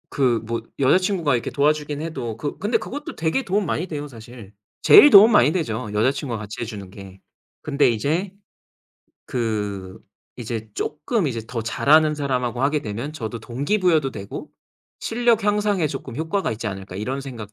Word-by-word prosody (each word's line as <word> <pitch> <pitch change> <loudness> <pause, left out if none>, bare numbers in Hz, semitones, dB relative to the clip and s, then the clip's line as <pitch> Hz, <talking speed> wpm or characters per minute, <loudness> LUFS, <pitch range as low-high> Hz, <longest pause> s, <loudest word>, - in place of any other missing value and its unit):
그 125 -4 +1
뭐 115 +1 -3 0.2
여자친구가 170 +1 +2
이렇게 120 - -3
도와주긴 150 0 0
해도 120 -9 -5
그 145 +5 -4
근데 205 +4 +1
그것도 290 +3 -7
되게 165 +12 0
도움 205 -1 0
많이 175 +1 -2
돼요, 150 -3 -5
사실. 115 -4 -12 0.3
제일 295 - +9
도움 210 -1 +9
많이 150 - +5
되죠, 115 - -2
여자친구가 125 +3 0
같이 105 +2 -7
해 - - -2
주는 100 -4 -8
게. 95 -1 -12 0.4
근데 145 -2 +2
이제 155 - -1 1.0
그 105 -5 -3 0.4
이제 115 -2 -5
쪼끔 170 +6 -1
이제 120 -5 -2
더 115 -1 -4
잘하는 150 +6 +3
사람하고 125 -4 -2
하게 145 +2 +2
되면 115 +8 -5
저도 115 -6 -5
동기부여도 150 - +1
되고 100 -5 -8 0.5
실력 230 -2 +1
향상에 205 -4 +1
쪼끔 135 -4 -6
효과가 165 +5 -1
있지 110 +1 -5
않을까 95 -2 -6
이런 130 +7 -3
생각 115 -7 -8
135 Hz, 350 characters per minute, -22 LUFS, 115-160 Hz, 1.0 s, 제일